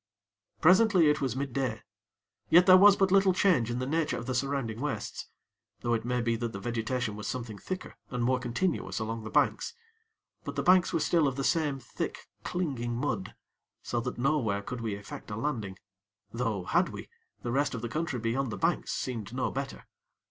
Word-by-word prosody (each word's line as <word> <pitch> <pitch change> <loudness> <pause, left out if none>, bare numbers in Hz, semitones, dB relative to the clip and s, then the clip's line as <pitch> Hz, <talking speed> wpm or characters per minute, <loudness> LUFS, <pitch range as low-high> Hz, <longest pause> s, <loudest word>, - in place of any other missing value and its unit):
Presently 180 -2 +6
it 150 - -1
was 130 -4 -1
midday; 130 -4 -2 0.7
yet 180 +2 +7
was 190 +2 +9
there - - -17
but 195 -1 +3
little 195 -1 +5
change 175 - +3
in 120 - -2
the 130 - -2
nature 155 +3 0
of 120 - -6
the 130 - -2
surrounding 130 -3 -2
wastes; 150 0 -4 0.5
though 120 - 0
it 115 0 -1
may 125 0 0
be 115 0 +1
that 115 0 -3
the 100 - -5
vegetation 115 +1 -2
was 105 0 -6
something 115 -4 -5
thicker, 185 -1 -6
and 125 -2 -2
more 130 +1 +2
continuous 125 +9 -1
along 115 0 -3
the 110 - -6
banks. 465 - +1 0.7
But - - -6
the - - -1
banks 185 -1 +5
were - - +1
still 160 -1 +3
of 135 - -1
the 135 - -2
same 150 -2 +1
thick, 120 - -5 0.2
clinging 130 -10 -2
mud; 120 - -2 0.5
so 120 - -1
that 125 +1 -4
nowhere 120 -7 +1
could 125 +2 -5
we 110 -3 -2
effect 100 0 -9
a 105 - -4
landing; 110 -6 -3 0.5
though, 115 -5 -2
had - - +2
we, - - -8 0.4
the 120 - -2
rest 140 +1 +1
of 115 - -6
the - - -1
country 155 +2 -2
beyond 120 +2 -1
the - - -4
banks - - 0
seemed 115 -4 -4
no 130 - 0
better. 135 0 -5
125 Hz, 195 wpm, -29 LUFS, 115-150 Hz, 0.7 s, was